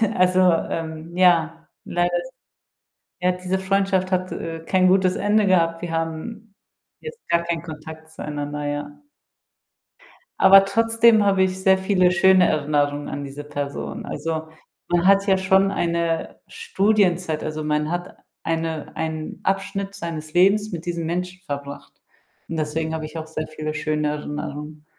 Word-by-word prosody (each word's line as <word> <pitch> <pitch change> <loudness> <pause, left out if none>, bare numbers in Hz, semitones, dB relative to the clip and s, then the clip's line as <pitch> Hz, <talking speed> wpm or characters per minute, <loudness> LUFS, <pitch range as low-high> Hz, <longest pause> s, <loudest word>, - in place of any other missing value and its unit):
also, 185 0 +3
ähm, 165 0 -3
ja, 165 -3 +3 0.2
leider 175 0 0
is 175 +9 -3 0.9
ja, 180 - +4
diese 180 +1 -2
Freundschaft 190 -1 0
hat, 185 0 0
äh, 165 -1 -5
kein 185 +1 +3
gutes 185 0 +3
Ende 210 +1 +2
gehabt. 165 -3 +2
Wir 175 - -4
haben 165 +7 -5 0.5
jetzt 465 0 -8
gar 170 0 +2
keinen 170 -1 -2
Kontakt 160 0 -10
zueinander, 150 -1 -5
ja. 145 - -5 1.4
Aber 195 0 +8
trotzdem 225 +2 +4
habe 195 -1 +3
ich 190 0 -1
sehr 190 0 +5
viele 190 -1 +2
schöne 185 0 +5
Erinnerungen 145 -1 0
an 145 - -5
diese 140 +1 -8
Person. 145 -1 -5
Also, 160 -1 -4 0.4
man 175 0 +2
hat 195 +1 +5
ja 195 - +4
schon 190 +1 +3
eine 170 -3 -1
Studienzeit, 195 - 0
also 155 0 -4
man 150 0 -1
hat 175 +1 -4 0.3
eine 165 -1 -3
einen 160 -1 -4
Abschnitt 195 +1 -2
seines 155 -3 -6
Lebens 200 +4 +3
mit 170 -1 -6
diesem 170 -1 -2
Menschen 180 +2 -3
verbracht 140 -2 -7 0.6
und 165 - -4
deswegen 160 +1 -2
habe 160 -1 -4
ich 155 +1 -7
auch 160 - -6
sehr 155 0 -5
viele 155 0 -5
schöne 150 0 -1
Erinnerungen. 150 0 -6
170 Hz, 145 wpm, -22 LUFS, 155-190 Hz, 1.4 s, Aber